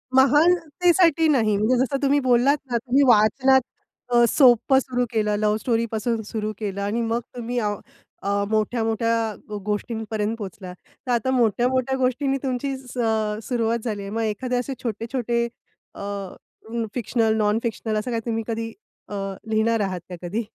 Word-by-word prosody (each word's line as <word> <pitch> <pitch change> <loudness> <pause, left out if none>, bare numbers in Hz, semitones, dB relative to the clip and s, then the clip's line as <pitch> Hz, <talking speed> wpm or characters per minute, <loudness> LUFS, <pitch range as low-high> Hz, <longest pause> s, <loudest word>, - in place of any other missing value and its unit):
महानतेसाठी 325 +3 +4
नाही. 225 -8 +3
म्हणजे 220 +5 +2
जसं 275 +1 -1
तुम्ही 285 +1 +3
बोललात 260 +2 +3
ना, 235 - +2
तुम्ही 265 +4 +2
वाचनात 260 +4 +5 0.5
अ, 240 0 +6
सोप्पं 265 0 +5
सुरु 250 -1 -1
केलं, 210 -2 +1
लव्ह 210 0 +2
स्टोरी 230 0 0
पासून 225 +1 -1
सुरु 215 -1 -2
केलं 200 -2 -4
आणि 210 +4 -1
मग 230 +1 0 0.2
तुम्ही 245 +1 -4
अ, 210 -2 0 0.5
अ, 200 0 0
मोठ्या-मोठ्या 225 0 0 0.3
गोष्टींपर्यंत 220 0 -2
पोहचलात. 190 -3 -8 0.3
तर - - 0
आता 240 +2 +1
मोठ्या-मोठ्या 255 +2 +1
गोष्टींनी 265 +2 +1
तुमची 265 +1 -2
स 255 -1 -12 0.5
सुरुवात 235 -2 0
झाली 210 -3 -2
आहे. 195 - -6
मग 225 +1 -2
एखादे 225 +4 -2
असे 250 +2 -2
छोटे-छोटे 235 +1 -1 0.5
अ, - - -9 0.9
फिक्शनल, 225 -1 +1
नॉन 210 +1 +2
फिक्शनल 220 -1 -2
असं 245 +3 -4
काय 230 - 0
तुम्ही 225 -1 -1
कधी 225 0 -3 0.4
अ, - - -7 0.4
लिहिणार 220 +1 +2
आहात 185 -2 -2
का 180 - -6
कधी? 220 +6 -2
230 Hz, 150 wpm, -23 LUFS, 215-255 Hz, 0.9 s, अ